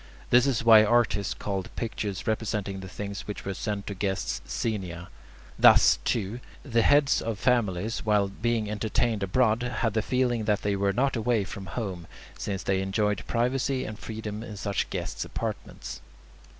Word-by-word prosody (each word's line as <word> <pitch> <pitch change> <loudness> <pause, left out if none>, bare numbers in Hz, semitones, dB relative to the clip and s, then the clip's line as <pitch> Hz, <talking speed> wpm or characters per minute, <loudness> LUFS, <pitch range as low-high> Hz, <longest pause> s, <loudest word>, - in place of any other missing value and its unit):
This 125 +2 +6
is 120 -5 +1
why 110 -2 +8
artists 110 -3 +2
called 95 -2 -3
pictures 105 -4 -3
representing 105 -3 -2
the 95 - -7
things 100 +1 -6
which 105 - -6
were 95 - -2
sent 100 +1 -3
to 100 - -4
guests 95 -1 -2
"xenia." 90 -6 -3 0.5
Thus, - - +7
too, 110 +1 -1 0.2
the 115 -5 +2
heads 145 +2 +4
of 115 -2 -3
families, 110 -4 +1
while 105 -2 +3
being 110 +2 -1
entertained 110 +1 0
abroad, 110 +4 +2
had 125 -3 -1
the 110 - +1
feeling 120 -2 0
that 105 -2 +1
they 100 -1 +1
were 100 0 +1
not 135 +7 +1
away 115 -1 +1
from 95 0 -8
home, 90 -3 -5 0.3
since 95 -3 -4
they 95 0 +1
enjoyed 105 +1 0
privacy 130 +2 0
and 110 0 -7
freedom 110 -1 -5
in 110 -3 -8
such 100 -1 -2
guests' - - -3
apartments. - - -6
105 Hz, 165 wpm, -27 LUFS, 100-115 Hz, 0.5 s, why